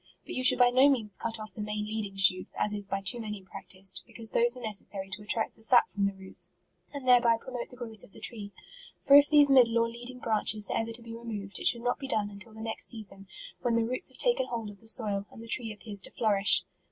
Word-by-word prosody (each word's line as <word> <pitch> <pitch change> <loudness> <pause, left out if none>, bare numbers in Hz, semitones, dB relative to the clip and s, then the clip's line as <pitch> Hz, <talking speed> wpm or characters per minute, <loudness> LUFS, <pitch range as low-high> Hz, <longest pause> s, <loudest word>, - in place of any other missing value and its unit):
But - - -8
you 255 - -3
should 255 - +9
by 245 -1 +4
no 260 +3 +5
means 220 -8 -1
cut 225 -1 -3
off 215 0 -9
the 215 - -8
main 210 0 -4
leading 215 -2 -5
shoots, 185 -1 +3
as 210 - 0
is 205 -1 0
by 195 0 -3
too 205 +5 -1
many 210 -3 -7
practised, 190 0 -5
be - - -20
cause 225 -1 +1
those 240 +2 +2
are - - -10
necessary 200 -3 -1
to 200 +3 -6
attract 220 +1 0
the - - -16
sap 240 +2 +4
from 200 -1 -1
the 200 - -4
roots, 190 0 -4 0.4
and 280 -3 -8
thereby 240 -2 +5
promote 245 +1 -7
the - - -12
growth 225 -4 -9
of - - -16
the - - -13
tree; 210 -4 -3 0.5
for 280 - +4
if 285 0 +7
these 290 -2 +5
middle 240 -3 +5
or 230 0 +2
leading 240 +2 -6
branches 215 -3 0
are - - -1
ever 225 0 -3
to 230 +1 -6
be 230 0 -10
removed, 215 -4 -7
it - - 0
should 235 -1 +1
not 245 0 -1
be 270 - -6
done 210 -5 -2
until 210 +2 -12
the 220 - -10
next 225 0 -3
season, 195 -3 -2 0.3
when 240 -2 0
the 230 -1 +1
roots 255 +3 0
have 260 - -17
taken - - +1
hold 225 -3 -5
of 200 - -16
the 225 - -11
soil, 205 -4 +2
and 225 - -13
the - - -12
tree 225 -1 0
appears 210 -1 -8
to - - -6
flourish. 205 -3 +4
225 Hz, 260 wpm, -28 LUFS, 205-240 Hz, 0.5 s, should